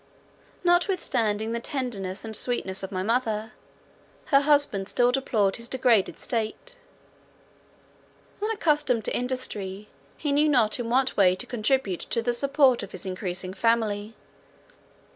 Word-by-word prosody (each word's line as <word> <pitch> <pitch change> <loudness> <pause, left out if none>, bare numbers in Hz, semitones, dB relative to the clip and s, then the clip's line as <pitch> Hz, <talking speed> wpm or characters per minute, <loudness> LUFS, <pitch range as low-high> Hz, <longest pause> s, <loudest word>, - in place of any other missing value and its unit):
Notwithstanding 295 - +1
the 235 - -1
tenderness 230 -7 -4
and 220 -1 -5
sweetness 205 -5 -1
of 190 - -6
my 185 -1 -2
mother, 220 -1 -1 0.8
her 275 - +8
husband 285 -10 +2
still 245 0 +3
deplored 220 -7 +1
his 230 0 -5
degraded 245 -6 +2
state. 230 - -3 1.7
Unaccustomed 300 - +1
to - - 0
industry, 210 -6 -3 0.3
he 295 - -2
knew 295 +2 +3
not 245 -5 +3
in 235 -1 -3
what 260 +2 +2
way 185 -3 +4
to - - -6
contribute 225 -5 0
to 230 - -2
the 240 +1 +1
support 275 0 +3
of 200 - -8
his 185 - -8
increasing 185 -1 -4
family. 220 0 0
230 Hz, 130 wpm, -26 LUFS, 205-265 Hz, 1.7 s, her